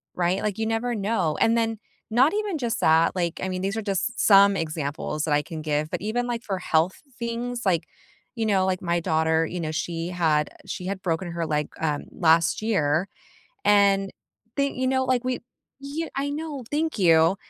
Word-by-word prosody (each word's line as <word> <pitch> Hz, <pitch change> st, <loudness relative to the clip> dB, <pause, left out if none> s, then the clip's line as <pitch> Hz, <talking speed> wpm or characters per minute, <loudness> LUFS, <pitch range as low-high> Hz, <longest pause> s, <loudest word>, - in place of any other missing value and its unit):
right? 180 Hz, +2 st, +1 dB
Like, 210 Hz, -2 st, -2 dB
you 220 Hz, -, -1 dB
never 225 Hz, +2 st, -1 dB
know. 195 Hz, -6 st, 0 dB
And 230 Hz, +1 st, +4 dB
then, 225 Hz, -1 st, 0 dB, 0.3 s
not 255 Hz, -, +4 dB
even 415 Hz, -5 st, -1 dB
just 235 Hz, -4 st, -2 dB
that, 160 Hz, +1 st, +4 dB
like, 175 Hz, -3 st, -2 dB
I 190 Hz, -, -1 dB
mean, 185 Hz, 0 st, -3 dB
these 195 Hz, +2 st, -1 dB
are 225 Hz, -, -2 dB
just 195 Hz, -3 st, -1 dB
some 200 Hz, -1 st, +7 dB
examples 155 Hz, -2 st, -3 dB
that 155 Hz, -, 0 dB
I 145 Hz, -, +3 dB
can 155 Hz, +1 st, -7 dB
give, 150 Hz, 0 st, -1 dB
but -, -, -3 dB
even, 225 Hz, +4 st, -1 dB
like, 240 Hz, -1 st, -3 dB
for 195 Hz, -2 st, -2 dB
health 165 Hz, +3 st, +1 dB, 0.2 s
things, 240 Hz, +1 st, -3 dB
like, 175 Hz, -4 st, +2 dB, 0.5 s
you 225 Hz, -, -1 dB
know, 195 Hz, -3 st, +2 dB
like 185 Hz, -1 st, -1 dB
my 170 Hz, -1 st, 0 dB
daughter, 160 Hz, 0 st, +2 dB
you 175 Hz, +2 st, -5 dB
know, 155 Hz, -2 st, -2 dB
she 165 Hz, +1 st, -3 dB
had 160 Hz, -4 st, +1 dB
uh, -, -, -22 dB
she 180 Hz, -, -5 dB
had 190 Hz, 0 st, -3 dB
broken 175 Hz, 0 st, -2 dB
her 170 Hz, -1 st, -2 dB
leg, 150 Hz, -1 st, -1 dB
um, 150 Hz, -2 st, -1 dB
last 165 Hz, +1 st, +3 dB
year, 180 Hz, -6 st, +1 dB, 0.6 s
and 200 Hz, -1 st, +4 dB, 0.5 s
they 280 Hz, 0 st, +1 dB
you 260 Hz, -1 st, -2 dB
know, 260 Hz, 0 st, +2 dB
like, 255 Hz, -1 st, +1 dB
we 255 Hz, 0 st, -1 dB, 0.4 s
y 310 Hz, +4 st, -4 dB
I 280 Hz, +1 st, -1 dB
know, 295 Hz, -2 st, -4 dB
thank 315 Hz, +2 st, -1 dB
you. 165 Hz, -1 st, +5 dB
190 Hz, 200 wpm, -25 LUFS, 165-235 Hz, 0.6 s, some